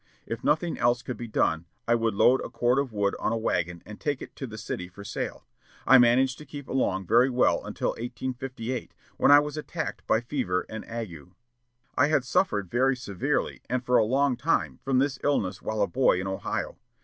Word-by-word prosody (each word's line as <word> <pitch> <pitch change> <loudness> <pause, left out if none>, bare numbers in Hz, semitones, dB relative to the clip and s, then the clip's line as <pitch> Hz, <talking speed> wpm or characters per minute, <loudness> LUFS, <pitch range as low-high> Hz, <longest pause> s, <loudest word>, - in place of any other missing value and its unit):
If 115 - -5
nothing 155 +3 +1
else 120 0 +2
could 125 - -4
be 120 - -6
done, 80 -6 +1 0.2
I 120 - +4
would 115 -3 +1
load 125 +6 +5
a - - -5
cord 120 +2 +2
of 140 -3 -2
wood 100 -2 0
on - - 0
a 115 - 0
wagon 90 -6 -1
and 105 0 -10
take 145 -4 -1
it - - -10
to 135 - -5
the 110 -2 -9
city 95 -4 -5
for 100 +3 -12
sale. 100 - -5 0.4
I 130 - +8
managed 125 +2 +4
to 150 - -10
keep 140 -1 -8
along 95 -8 0
very 120 +7 +4
well 125 -1 +2
until - - -2
1858, 125 0 -5 0.2
when - - +4
I 145 - +10
was 150 +1 0
attacked 155 - -5
by 110 - +3
fever 120 -8 -1
and 110 0 -6
ague. 95 -10 -6 0.7
I 145 - +4
had 150 -4 +2
suffered 100 -6 0
very 130 +2 +3
severely 100 -7 -2
and 125 0 -1
for 125 0 +4
a - - +5
long 135 +4 +2
time 165 +3 0
from 135 -2 +1
this 135 0 +1
disease 105 -9 0
while 110 -1 -1
a - - +1
boy 130 -8 +3
in 90 - -3
Ohio. 95 0 -3
120 Hz, 210 wpm, -27 LUFS, 105-135 Hz, 0.7 s, I